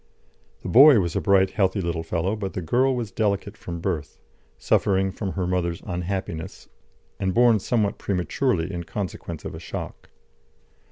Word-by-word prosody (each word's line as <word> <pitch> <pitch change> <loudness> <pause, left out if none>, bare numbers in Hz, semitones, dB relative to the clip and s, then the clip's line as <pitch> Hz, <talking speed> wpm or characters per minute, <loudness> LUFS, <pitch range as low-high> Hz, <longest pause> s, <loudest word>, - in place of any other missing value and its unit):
] - - -38
The - - -5
boy 135 0 +8
was 85 -4 -2
a - - +1
bright, 95 -1 +3
healthy 95 0 +1
little 85 -2 -2
fellow, 85 +5 -1
but 100 -3 -5
the 95 - -3
girl 130 +10 +2
was 115 -5 -4
delicate 100 -2 -1
from 85 -1 -7
birth, 80 -6 -3 0.4
suffering 95 -1 +1
from 95 -1 -4
her 95 -2 -2
mother's 90 -2 -1
unhappiness, 90 -2 -4 0.5
and 95 -1 -1
born 120 -2 +5
somewhat 105 -1 0
prematurely 95 -1 -1
in 85 -1 -4
consequence 85 -5 -6
of - - -5
a - - -7
shock. - - -7
95 Hz, 165 wpm, -24 LUFS, 85-105 Hz, 0.5 s, boy